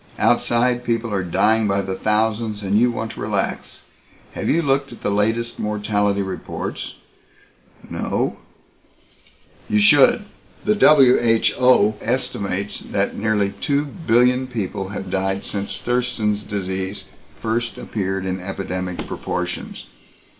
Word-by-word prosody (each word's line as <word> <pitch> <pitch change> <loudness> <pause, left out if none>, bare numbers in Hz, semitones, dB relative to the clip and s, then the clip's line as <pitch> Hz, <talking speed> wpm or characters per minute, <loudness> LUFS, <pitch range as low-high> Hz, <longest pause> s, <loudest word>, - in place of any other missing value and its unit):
"Outside, 120 +1 +2
people 115 -2 -1
are 100 - +1
dying 105 +5 +2
by 100 0 +1
the 95 0 -3
thousands 110 +1 0
and 100 +2 +2
you 125 +1 +4
want 115 -2 -4
to - - -11
relax. - - -3 0.5
Have - - -3
you 165 +2 +2
looked 140 -1 +1
at 120 - -12
the - - 0
latest 115 +3 0
mortality 105 -1 0
reports?" 95 - -5 0.9
"No - - -2 0.6
" - - -30
"You 105 - +2
should. 145 - +5 0.4
The 210 - +4
WHO 125 - +5
estimates 100 -5 -2
that 100 0 -2
nearly 105 -2 +1
two 145 +1 +1
billion 125 -4 +2
people 100 -5 -4
have 95 -2 -6
died 95 +1 -1
since 100 -1 -4
Thurston's 120 -4 0
Disease 95 -1 -4 0.3
first 115 +1 -2
appeared 95 -2 -3
in 95 0 -2
epidemic 90 -1 -4
proportions. 90 0 -4
105 Hz, 125 wpm, -21 LUFS, 100-120 Hz, 0.9 s, should